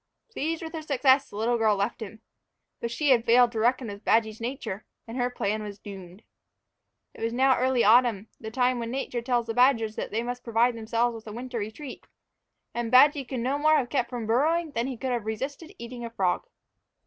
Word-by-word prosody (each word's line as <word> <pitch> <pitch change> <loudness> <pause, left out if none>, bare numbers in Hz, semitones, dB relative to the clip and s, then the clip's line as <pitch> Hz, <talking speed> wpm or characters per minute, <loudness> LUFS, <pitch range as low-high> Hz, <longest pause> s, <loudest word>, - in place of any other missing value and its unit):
Pleased 330 -4 -3
with 320 0 -7
her 320 - -4
success, 275 -2 +3
the - - -12
little 230 +3 0
girl 215 -2 +3
left 200 +4 -2
him. 220 +1 -8 0.6
But 235 - -3
she 285 +4 +1
had 235 -3 +4
failed 240 +1 +5
to 225 - -3
reckon 240 +2 +1
with 205 0 -8
Badgy's 220 -1 +1
nature, 235 -5 -4 0.2
and 225 - -7
her 245 -1 0
plan 215 -3 -2
was 205 -1 -7
doomed. 195 0 -11 0.9
It - - -13
was 230 +1 -1
now 260 +1 +4
early 255 -1 +2
autumn, 225 -2 +4
the 220 - -6
time 250 +1 +1
when 230 -1 -4
Nature 250 -1 -3
tells 240 -1 0
the 225 - -3
badgers 230 -3 +3
that - - -3
they 225 +2 -2
must 245 0 -5
provide 235 +1 +2
themselves 230 +2 0
with 225 -1 -10
a - - -6
winter 245 +2 -5
retreat, 220 +7 -7 0.7
and 235 -1 -2
Badgy 280 +3 +6
could 250 -1 -4
no 265 +4 0
more 310 +1 +4
have 245 -4 -1
kept 250 -4 0
from 240 -3 -4
burrowing 310 +8 +1
than 235 -2 -1
he 260 -3 -5
could 260 +2 -3
have 235 -3 -2
resisted 275 - -4
eating 240 +1 -8
a 235 - -4
frog. 190 -6 -1
240 Hz, 215 wpm, -27 LUFS, 225-260 Hz, 0.9 s, Badgy